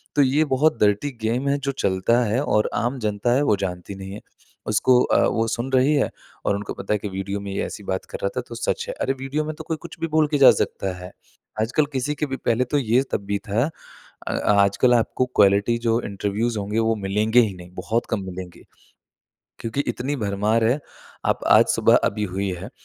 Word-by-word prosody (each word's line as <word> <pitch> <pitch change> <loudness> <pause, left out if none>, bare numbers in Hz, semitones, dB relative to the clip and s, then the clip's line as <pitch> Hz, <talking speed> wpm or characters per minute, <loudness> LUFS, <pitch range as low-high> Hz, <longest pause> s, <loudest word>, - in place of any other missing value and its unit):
तो 145 - +5
ये 140 +3 +3
बहुत 140 -2 +2
डर्टी 105 +7 +2
गेम 120 +5 -1
है 140 - +2
जो 140 0 -2
चलता 115 0 +1
है 115 +5 0
और 105 -7 +1
आम 120 +4 -1
जनता 105 +2 0
है 135 - +3
वो 110 - +3
जानती 95 0 -5
नहीं 95 0 -8
है। 105 - -8 0.5
उसको 125 +4 +4
अ, - - +3
वो 115 0 0
सुन 120 +3 -3
रही 130 +3 +4
है 140 - +2 0.4
और 100 - +2
उनको 100 +1 -5
पता 100 - -3
है - - +2
कि 105 - -5
वीडियो 95 +1 -4
में 100 0 -6
ये - - -1
ऐसी 105 - -8
बात 95 -1 -3
कर - - -4
रहा 100 - +2
था - - +1
तो 120 - -7
सच 470 - -2
है। - - -2
अरे - - +1
वीडियो 140 +3 -2
में 155 0 -4
तो 160 - -8
कोई 160 - -2
कुछ 170 0 -10
भी 165 - -1
बोल 155 -1 +2
के 145 0 0
जा 135 - +9
सकता 95 -1 -2
है। 90 0 -9 0.5
आजकल 125 +7 +1
किसी 135 +2 -1
के 150 - -1
भी 135 -2 -4
पहले 120 0 +1
तो 145 +4 0
ये 120 0 +2
तब - - -1
भी 100 0 -1
था। 115 +8 +1 0.6
अ, - - -1
आजकल 100 +4 +3
आपको 120 +2 +1
क्वालिटी 100 +3 +4
जो 115 0 +3
इंटरव्यूज़ 105 +3 -2
होंगे 105 +2 -2
वो 115 0 +2
मिलेंगे 110 +4 +3
ही 110 -4 0
नहीं 90 0 -12
बहुत 115 +6 -1
कम 110 -3 -1
मिलेंगे। 90 -1 -8 1.0
क्योंकि 115 +5 -2
इतनी 125 +4 -2
भरमार 105 +3 +1
है 125 +6 +2 0.5
आप - - +1
आज - - +7
सुबह - - +4
अभी 105 0 -1
हुई 95 0 -1
है, 90 +4 -7
115 Hz, 225 wpm, -23 LUFS, 100-130 Hz, 1.0 s, जा